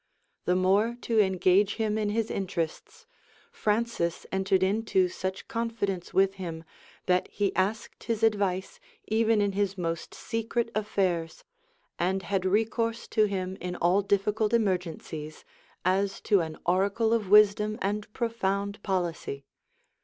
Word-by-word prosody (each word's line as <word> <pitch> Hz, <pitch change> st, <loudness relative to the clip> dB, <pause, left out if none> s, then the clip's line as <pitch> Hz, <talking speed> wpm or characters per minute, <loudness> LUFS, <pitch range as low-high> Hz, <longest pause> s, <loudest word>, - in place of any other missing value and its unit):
The 180 Hz, -, +2 dB
more 200 Hz, +6 st, +2 dB
to 230 Hz, -2 st, +1 dB
engage 190 Hz, 0 st, +3 dB
him 220 Hz, -2 st, 0 dB
in 215 Hz, -1 st, 0 dB
his 225 Hz, +1 st, -1 dB
interests, 175 Hz, -4 st, -4 dB, 0.5 s
Francis 210 Hz, -6 st, -1 dB
entered 190 Hz, 0 st, +2 dB
into 195 Hz, -1 st, +2 dB
such 190 Hz, +1 st, -5 dB
confidence 225 Hz, -6 st, -2 dB
with 195 Hz, 0 st, +3 dB
him, 165 Hz, -2 st, -5 dB, 0.4 s
that 180 Hz, 0 st, +2 dB
he 200 Hz, -1 st, -1 dB
asked 205 Hz, +4 st, -2 dB
his 225 Hz, -1 st, -2 dB
advice 200 Hz, -4 st, +1 dB, 0.3 s
even 220 Hz, 0 st, +3 dB
in 205 Hz, -1 st, +1 dB
his 200 Hz, 0 st, -1 dB
most 165 Hz, -2 st, -3 dB
secret 230 Hz, 0 st, -2 dB
affairs; 185 Hz, -6 st, -1 dB, 0.6 s
and 190 Hz, +2 st, 0 dB
had 190 Hz, +1 st, -1 dB
recourse 225 Hz, +3 st, 0 dB
to 215 Hz, -, +3 dB
him 190 Hz, -2 st, -3 dB
in 180 Hz, 0 st, -4 dB
all 175 Hz, +3 st, +3 dB
difficult 210 Hz, +2 st, +1 dB
emergencies, 175 Hz, -7 st, -2 dB, 0.4 s
as 195 Hz, +2 st, +1 dB
to 205 Hz, -3 st, +3 dB
an 160 Hz, -1 st, -5 dB
oracle 200 Hz, +5 st, +2 dB
of 215 Hz, -5 st, 0 dB
wisdom 210 Hz, +1 st, +5 dB
and 210 Hz, +2 st, -2 dB
profound 200 Hz, -3 st, -2 dB
policy. 170 Hz, -8 st, -2 dB
200 Hz, 130 wpm, -28 LUFS, 185-215 Hz, 0.6 s, wisdom